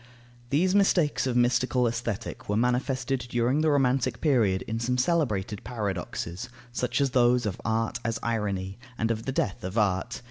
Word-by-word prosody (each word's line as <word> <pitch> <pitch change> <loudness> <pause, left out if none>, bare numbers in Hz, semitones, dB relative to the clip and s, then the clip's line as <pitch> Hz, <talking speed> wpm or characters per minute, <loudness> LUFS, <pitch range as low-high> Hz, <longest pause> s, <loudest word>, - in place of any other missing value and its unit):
These 180 +8 +2
mistakes 180 -9 +3
of 125 - -1
mystical 125 +1 +2
Aesthetic 115 -4 -4
were 105 - +1
manifested 130 +2 0
during 120 +5 +1
the 155 - +3
Romantic 135 -3 +2
period 115 - +2
in 115 +1 -3
some 125 +2 0
celebrated 115 - 0
paradoxes, 100 -2 -4 0.2
such 120 +1 -1
as 140 -2 +2
those 125 -1 +3
of 100 -3 -3
art 115 +2 -1
as 115 0 -1
irony 100 -4 -2 0.2
and 110 +1 0
of 115 +1 -3
the - - +1
death 95 -8 -2
of 95 +4 -4
art. 105 +2 +1
120 Hz, 165 wpm, -27 LUFS, 105-130 Hz, 0.2 s, mistakes